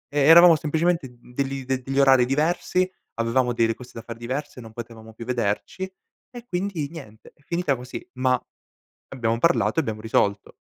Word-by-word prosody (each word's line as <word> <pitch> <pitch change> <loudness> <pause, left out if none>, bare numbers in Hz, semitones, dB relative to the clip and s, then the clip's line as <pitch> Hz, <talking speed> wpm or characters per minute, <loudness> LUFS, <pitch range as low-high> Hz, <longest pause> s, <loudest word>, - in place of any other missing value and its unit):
e 145 - +3
eravamo 165 +4 +8
semplicemente 160 -1 0
d 120 -1 -21
degli 135 0 -2
de 130 0 -1
degli 135 +2 -2
orari 135 -2 +6
diversi, 170 +6 +1 0.3
avevamo 120 +2 +1
delle 115 -1 +1
cose 125 0 -12
da 115 - -7
fare 115 -1 -8
diverse, 130 +2 -5
non 115 -1 -11
potevamo 115 -1 -9
più 115 +1 -9
vederci 125 - -2 0.4
e 240 0 -9
quindi 180 -5 -2
niente 130 -10 -12
è - - -31
finita 170 -4 0
così 125 +1 -8
ma 130 0 +2 0.7
abbiamo 115 -3 -1
parlato 170 +2 +2
e - - +4
abbiamo 110 -5 -4
risolto. 100 -2 0
130 Hz, 175 wpm, -24 LUFS, 115-160 Hz, 0.7 s, eravamo